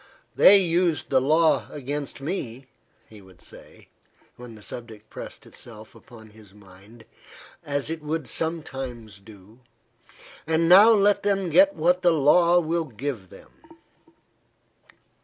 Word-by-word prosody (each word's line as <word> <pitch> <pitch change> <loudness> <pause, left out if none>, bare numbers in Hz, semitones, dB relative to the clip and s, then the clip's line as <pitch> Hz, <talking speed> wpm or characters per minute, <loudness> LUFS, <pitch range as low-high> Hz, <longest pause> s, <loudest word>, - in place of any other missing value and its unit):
"They 200 - +7
used 170 -6 -1
the 130 -1 +3
law 155 +4 +1
against 145 0 -6
me," 135 -6 -6 0.4
he 110 -2 -16
would 95 -2 -20
say, - - -17 0.5
when 120 -2 -12
the 105 - -15
subject 110 -3 -11
pressed - - -10
itself 110 -2 -11
upon 110 -1 -16
his 105 -2 -19
mind, 100 +3 -18 0.6
as 145 +1 -3
it 165 -1 -6
would 150 -2 -4
sometimes 130 -8 -5
do, 105 +2 -18 0.9
"and 160 +1 +1
now 195 +6 +8
let 205 -2 +3
them 195 -3 -1
get 290 - +4
what 180 +3 +1
the 175 -2 +3
law 170 +4 +3
will 165 0 -2
give 120 - -7
them." - - -17
140 Hz, 130 wpm, -24 LUFS, 110-170 Hz, 0.9 s, now